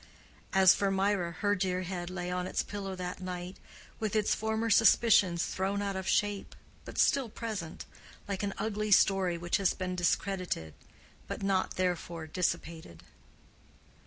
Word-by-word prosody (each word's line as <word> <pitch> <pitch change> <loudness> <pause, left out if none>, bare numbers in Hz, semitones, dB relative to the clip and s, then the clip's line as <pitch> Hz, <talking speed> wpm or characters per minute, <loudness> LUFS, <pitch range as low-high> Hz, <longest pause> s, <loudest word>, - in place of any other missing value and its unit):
As 190 -1 +7
for 200 - 0
Mirah 195 -2 +1
her 205 -1 +3
dear 185 -2 -1
head 175 -1 -4
lay 180 -1 -4
on 180 0 -2
its - - -1
pillow 195 -2 -5
that 180 0 -5
night 180 0 -6 0.4
with 215 -1 -2
its 215 -1 +2
former 220 +1 -1
suspicions 205 -5 +5
thrown 195 +2 -2
out 200 -1 -2
of 190 0 -4
shape 205 -1 0 0.3
but - - -9
still 270 -4 +3
present, 210 -8 -5 0.4
like 200 -2 -3
an 200 -1 -2
ugly 215 -1 -2
story 190 -3 +4
which 175 +1 0
had 195 -2 +1
been 185 -1 -3
discredited 175 - -1 0.5
but - - -5
not 195 -1 0
therefore 175 -3 -2
dissipated. 160 - -3
190 Hz, 150 wpm, -31 LUFS, 180-205 Hz, 0.5 s, As